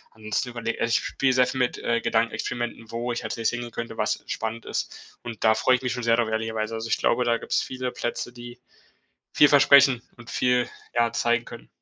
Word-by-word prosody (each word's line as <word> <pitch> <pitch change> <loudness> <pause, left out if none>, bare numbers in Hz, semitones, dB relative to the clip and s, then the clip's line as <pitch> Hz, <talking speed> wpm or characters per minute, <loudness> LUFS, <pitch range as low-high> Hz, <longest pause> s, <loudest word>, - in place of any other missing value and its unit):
und 110 -1 -9
zu 125 - 0
überle 115 -1 -3
also - - +2
ich - - -3
spiel 130 -1 0
sehr 125 0 +4
viel 130 - -4
mit, 125 - 0
äh, 115 0 0
Gedankenexperimenten, 115 0 -2
wo 120 +1 -3
ich 120 - -4
als - - -3
nächstes 115 0 0
hingehen 120 -1 -6
könnte, 115 0 -6
was - - -1
spannend 110 +1 -4
ist - - -6
und 115 -3 -7
da 110 - +6
freue 125 +3 +3
ich 125 - -4
mich 130 -1 -2
schon 125 - -4
sehr 115 0 +4
darüber 115 -2 0
ehrlicherweise. 110 0 -2
Also 110 0 -4
ich - - +1
glaube, 125 +1 +1
da 120 -1 +2
gibt's - - -1
viele 130 -1 -4
Plätze, 120 0 -4
die 120 0 -11 0.8
viel 145 - +7
versprechen 140 -3 +6 0.2
und 120 +1 -12
viel, 125 -2 +2 0.3
ja, 120 -1 +2
zeigen 120 0 +1
können. 115 - -11
120 Hz, 225 wpm, -25 LUFS, 115-125 Hz, 0.8 s, viel